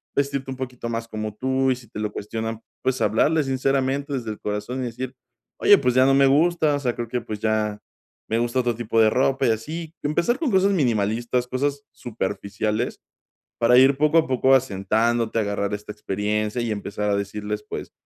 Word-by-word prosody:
vestirte 140 -1 -1
un - - -4
poquito 125 -2 -5
más 115 0 -3
como 110 -1 -5
tú, 130 +2 +1
y - - +1
si 120 -3 -14
te 105 - -7
lo 105 -1 -2
cuestionan, 110 +2 -5 0.2
pues 130 0 0
hablarles 150 +6 +2
sinceramente, 135 +2 0
desde 120 -5 -3
el 105 - -8
corazón 105 +5 -3
y - - -2
decir: 125 +2 -5 0.5
"Oye, 205 - +7
pues 125 -5 +1
ya 130 - +6
no 135 - +4
me 135 0 +5
gusta, 155 +1 +3
o - - -2
sea, 125 -4 -1
creo 120 -1 -4
que, 125 0 -1
pues 105 -1 -6
ya 110 -1 0 0.5
me 115 - +1
gusta 120 +2 0
otro 120 -1 0
tipo 115 0 -1
de 110 - +6
ropa", 135 +2 +1
y - - +4
así. 155 +9 -4
Empezar 170 - +1
con 315 -6 0
cosas 195 +1 +4
minimalistas, 120 - 0
cosas 140 +2 -2
superficiales, 105 0 -3 0.6
para 120 +1 +5
ir 135 +1 +6
poco 150 +3 +3
a 160 - +3
poco 130 +1 +4
asentándote, 115 0 0
agarrar 100 -1 -1
esta 105 +1 -6
experiencia, 105 +3 -2
y 115 -2 -1
empezar 105 0 -3
a 100 - +2
decirles, 105 +1 -4
pues, - - -6
120 Hz, 195 wpm, -23 LUFS, 110-135 Hz, 0.6 s, Oye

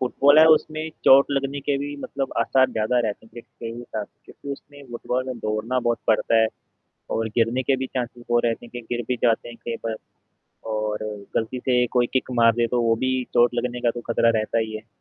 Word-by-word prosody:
Football 140 +3 +4
है, 160 - +9
उसमें 155 +1 -3 0.2
चोट 135 +1 +7
लगने 140 0 -1
के 140 0 0
भी 145 +1 -4
मतलब 135 -1 -4
आसार 130 -1 +3
ज़्यादा 110 +3 0
रहते 105 +1 -5
हैं, - - -22
जितने 115 -1 -9
भी 120 +1 -8
ट 105 - -2 0.2
क्योंकि 140 - -8
उसमें 145 +1 -12
फुटबॉल 125 +2 -2
में 130 -2 -5
दौड़ना 110 +4 -1
बहुत 120 -1 0
पड़ता 110 +1 +3
है, 110 - +4 0.6
और 115 0 -1
गिरने 120 +2 +2
के 135 +1 +1
भी 130 - -3
चांससेज़ 120 -2 -5
वो 120 - +4
रहते 115 0 -1
हैं - - -17
कि 120 - -6
गिर 120 - -2
भी 125 - 0
जाते 115 0 +2
हैं 120 - -10
कई 115 -1 -2
बार 115 -1 -1 0.8
और 110 0 -2 0.3
गलती 115 +3 -1
से 125 -1 +2
कोई 120 -1 +4
किक 130 -1 0
मार 115 0 +6
दे, 120 +1 +1
तो 120 +1 0
वो 115 -1 +3
भी 130 - +1 0.2
चोट 120 0 +4
लगने 125 0 -2
का 120 - +2
तो 120 - -6
खतरा 115 0 +4
रहता 110 +2 -1
ही 110 -1 -2
है। 110 - -11
120 Hz, 225 wpm, -23 LUFS, 115-130 Hz, 0.8 s, है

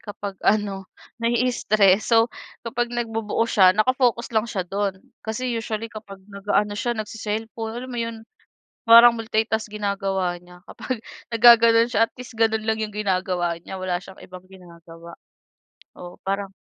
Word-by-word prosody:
kapag 205 -1 -7
ano 200 -2 0 0.3
nai-stress 220 -4 +2
so 230 0 +5 0.4
kapag 240 +1 -2
nagbubuo 225 -2 -2
siya, 190 -5 +5
naka-focus 245 +1 +1
lang 220 +1 +2
siya 190 -3 -2
dun 195 0 -2 0.2
kasi 235 +3 -4
usually 225 0 -4
kapag 200 -3 -11
nag-aano 205 +1 -1
siya 240 +2 -1
nagce-cellphone 220 +1 -5
alam 255 +1 -7
mo 240 - -4
iyon 230 -1 -4 0.7
parang 235 +1 +8
multitask 220 0 -1
ginagawa 195 -3 -2
niya 180 0 -16
kapag 255 -4 -5 0.3
nagaganoon 230 0 +6
siya 225 -1 +3
at - - -51
least 250 0 -10
ganoon 220 -1 0
lang 220 0 0
iyong 210 -1 -4
ginagawa 185 -4 -1
niya 190 - -8
wala 180 -1 -1
siyang 190 0 -14
ibang 185 0 -11
ginagawa, 170 -2 -14 0.8
oo 175 0 -11
parang 195 0 -2
215 Hz, 145 wpm, -23 LUFS, 195-230 Hz, 0.8 s, parang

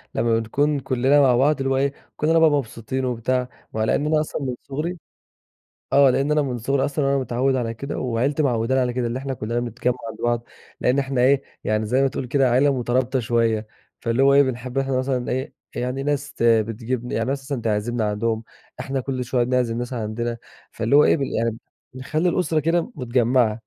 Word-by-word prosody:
لما 115 -1 +2
بنكون 145 +6 0
كلنا 135 +3 +3
مع 130 -3 +5
بعض، 145 +4 +3
اللي 135 - 0
هو 135 - +1
إيه، 140 +1 +1 0.2
كلنا 160 +2 +3
مبسوطين 130 -4 +1
وبتاع. 125 +1 -1 0.2
وعلى 110 0 +1
إن 150 - -1
أنا 155 0 +2
أصلًا 155 - -4
من 125 -2 -2
صغري 155 +6 -4 1.0
آه، 140 -1 +6
لإن 140 +4 +1
أنا 150 -1 +3
من 125 -3 -3
صغري 135 +4 0
أصلًا 145 0 -1
وأنا 140 0 +2
متعود 130 +1 0
على 115 -2 -2
كده، 140 +6 -5
وعيلتي 130 +5 0
معوّدانا 130 0 +1
على 125 -1 0
كده، 120 -1 -1
إن 120 +2 -3
إحنا 135 0 -3
كلنا 115 +1 -2
بنتجمع 120 +1 -1 0.2
مع - - -8
بعض، 120 0 0 0.4
لأن 125 +3 +2
إحنا 135 -2 0
ايه، 135 +2 +4 0.2
يعني 110 0 0
زي 130 +5 +2
ما 135 - +3
تقول 130 -1 -4
كده 135 0 +2
عيلة 135 +2 +3
مترابطة 125 +2 0
شوية، 115 -2 +1 0.3
فاللي 115 +3 +1
هو 140 0 +5
إيه، 140 - +7
بنحب 125 0 -3
إحنا 135 -1 0
مثلًا 130 -1 -1
إيه، 130 +2 -3 0.2
يعني 125 +2 -2
ناس 140 -1 -2
ت - - -5
بتجيب 115 +2 +1
ن - - -6
يعني 115 - 0
ناس 135 0 -2
مثلًا 135 -4 -4
تعزمنا 110 +1 0
عندهم، 110 +1 -1 0.4
إحنا 135 -1 -2
كل 130 -1 -3
شوية 120 -1 +1
بنعزم 125 -2 0
ناس 120 +1 -4
عندنا، 115 0 -3 0.3
فاللي 115 +6 +1
هو 150 - +7
إيه - - +4
بال 140 - -1
يعني 115 0 -1 0.4
نخلي 155 +7 -1
الأسرة 165 -3 +1
كده 170 - 0
متجمعة. 120 -2 +2
130 Hz, 205 wpm, -23 LUFS, 120-140 Hz, 1.0 s, إيه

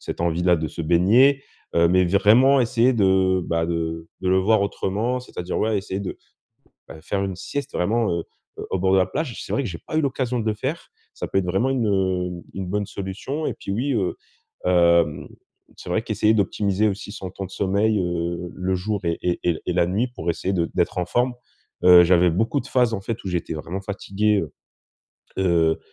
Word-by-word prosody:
cette - - -6
envie 85 0 0
là 90 -1 +4
de 80 0 -3
se 85 - -6
baigner. 115 - +4 0.3
Heu, 85 0 +5
mais 90 +1 +4
vraiment 120 +9 +5
essayer 120 +1 +2
de, 95 -3 +3
bah, 85 0 0
de 80 -1 -3
de 95 - -1
le 95 - +4
voir 100 +2 +3
autrement, 105 +6 -1
c'est-à-dire, 90 -7 -5
ouais, 110 0 +1
essayer 95 0 -4
de, 100 - -5 0.7
bah, 80 - -11
faire 100 +4 -2
une 95 -2 -4
sieste 145 +8 -5
vraiment, 110 +5 +1
heu, 85 -1 -2 0.5
au 95 - 0
bord 95 +1 +1
de - - +5
la 90 - +3
plage. 125 - -4
C'est - - -7
vrai 140 - +1
que 115 - -3
j'ai 85 - -7
pas 155 - -3
eu - - +4
l'occasion 130 -3 -1
de 110 - -4
le 110 - +2
faire. 135 +10 -4 0.3
Ça - - -5
peut - - +1
être 95 - -1
vraiment 95 +9 +1
une, 125 -4 0
heu, 90 -3 -1
une 95 -1 -4
bonne 100 +2 -2
solution, 105 +10 -5
et - - -2
puis - - -8
oui, 130 +7 -1
heu, 95 -5 -1 0.5
hem, 85 -3 +3 0.5
c'est - - -9
vrai 110 +5 +1
qu'essayer 110 0 +1
d'optimiser 100 +1 +1
aussi 100 +1 -5
son 95 -4 -7
temps 95 +2 -6
de - - -16
sommeil, 100 +2 +1
heu, 85 0 -3
le 95 0 -1
jour 100 +3 -2
et 85 -1 -1
et 90 -1 0
et 85 -3 0
et 90 - 0
la 85 -1 +3
nuit 105 +8 0
pour 85 - -6
essayer 95 +3 -2
de 85 -2 0
d'être 90 0 0
en 90 - -1
forme. 120 +6 0 0.5
Heu, 90 -1 +9
j'avais 90 0 +4
beaucoup 115 - 0
de - - -10
phases 125 -3 +2
en 100 - -3
fait 115 +3 -4
où - - -3
j'étais 90 -3 -3
vraiment 85 +5 -5
fatigué, 100 +1 0
heu, 75 - -6 0.9
heu, 85 -3 +2
95 Hz, 215 wpm, -23 LUFS, 90-110 Hz, 0.9 s, Heu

